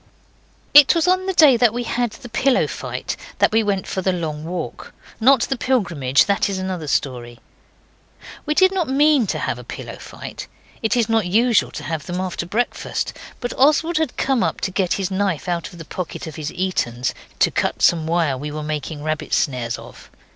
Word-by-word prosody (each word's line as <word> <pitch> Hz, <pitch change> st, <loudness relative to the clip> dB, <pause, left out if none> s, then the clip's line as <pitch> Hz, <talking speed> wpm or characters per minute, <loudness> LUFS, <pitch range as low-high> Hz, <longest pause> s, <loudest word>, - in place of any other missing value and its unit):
It 290 Hz, +1 st, +9 dB
was 335 Hz, +1 st, +2 dB
on 370 Hz, +1 st, +2 dB
the 380 Hz, -, 0 dB
day 295 Hz, -8 st, +6 dB
we 240 Hz, +3 st, -3 dB
had 240 Hz, 0 st, -1 dB
the -, -, -11 dB
pillow 255 Hz, +3 st, +2 dB
fight -, -, -5 dB, 0.2 s
that -, -, +3 dB
we 225 Hz, +1 st, +3 dB
went 200 Hz, -3 st, -1 dB
for 190 Hz, -, -3 dB
the 190 Hz, -, +1 dB
long 155 Hz, -4 st, -4 dB
walk. 170 Hz, -1 st, -6 dB, 0.2 s
Not 260 Hz, +2 st, +5 dB
the 270 Hz, -, 0 dB
Pilgrimage 180 Hz, -, +2 dB
that 200 Hz, 0 st, +1 dB
is 195 Hz, -, -2 dB
another 185 Hz, -4 st, -4 dB
story. 120 Hz, -4 st, -2 dB, 1.1 s
We 300 Hz, -, +1 dB
did 375 Hz, +2 st, +5 dB
not 360 Hz, -7 st, -1 dB
mean 285 Hz, -3 st, +4 dB
to -, -, -1 dB
have -, -, -2 dB
a -, -, -9 dB
pillow -, -, -8 dB
fight. -, -, -9 dB, 0.3 s
It 220 Hz, +1 st, +1 dB
is 230 Hz, -3 st, +2 dB
not 225 Hz, -4 st, +1 dB
usual 230 Hz, +4 st, +3 dB
to -, -, -6 dB
have 160 Hz, -3 st, -4 dB
them 180 Hz, 0 st, -3 dB
after 180 Hz, -2 st, -3 dB
breakfast, 235 Hz, +6 st, -2 dB, 0.3 s
but 245 Hz, -, -3 dB
Oswald 310 Hz, +5 st, +3 dB
had 315 Hz, -5 st, -2 dB
come 265 Hz, -3 st, +1 dB
up -, -, -1 dB
to 190 Hz, -, -1 dB
get 185 Hz, -2 st, 0 dB
his 195 Hz, -1 st, -2 dB
knife 190 Hz, -5 st, -1 dB
out 170 Hz, -2 st, -2 dB
of 175 Hz, -, -13 dB
the 165 Hz, -, -9 dB
pocket 180 Hz, +2 st, -6 dB
of 160 Hz, -, -8 dB
his 155 Hz, -2 st, -4 dB
Etons, 130 Hz, -10 st, -1 dB, 0.2 s
to -, -, +3 dB
cut -, -, -1 dB
some 160 Hz, -2 st, +3 dB
wire 160 Hz, -6 st, +1 dB
we 150 Hz, +2 st, -5 dB
were 150 Hz, +1 st, -5 dB
making 150 Hz, 0 st, -4 dB
rabbit 155 Hz, 0 st, -1 dB
snares 125 Hz, -4 st, -1 dB
of. -, -, -13 dB
190 Hz, 200 wpm, -21 LUFS, 160-245 Hz, 1.1 s, It